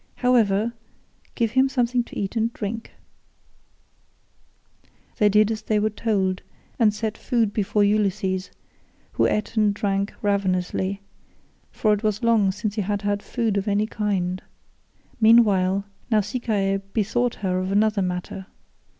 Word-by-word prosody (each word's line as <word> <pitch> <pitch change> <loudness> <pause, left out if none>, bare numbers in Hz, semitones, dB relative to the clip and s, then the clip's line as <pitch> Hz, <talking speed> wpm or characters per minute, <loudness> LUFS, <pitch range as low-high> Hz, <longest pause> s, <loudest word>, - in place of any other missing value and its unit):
However, 230 -3 +2 0.6
give 230 -3 0
him 265 +2 +3
something 245 -2 +1
to - - -10
eat 195 +2 -3
and 225 0 +1
drink." 225 +2 -5 2.3
They 210 - +5
did 210 +1 +4
as 215 -2 -3
they 215 0 0
were 215 +1 +1
told, 195 -4 -1 0.4
and 220 -3 +5
set 215 +1 -3
food 230 -5 0
before 210 0 +1
Ulysses, 200 -2 0 0.6
who - - +2
ate 210 +2 -2
and 210 -2 +3
drank 200 0 -1
ravenously, 195 -1 0 0.7
for 215 -1 +1
it 205 - -1
was 215 0 -1
long 220 -4 +3
since 205 +1 -3
he 210 - -1
had 205 +1 -2
had 205 0 0
food 225 -4 -1
of 200 - -2
any 205 +1 +2
kind. 195 -4 -2 0.8
Meanwhile, 200 -4 +4 0.2
Nausicaa 210 -3 0
bethought 235 +3 0
her 185 -1 +1
of 185 +1 -2
another 210 0 +2
matter. 180 +1 -4
210 Hz, 135 wpm, -23 LUFS, 195-225 Hz, 2.3 s, They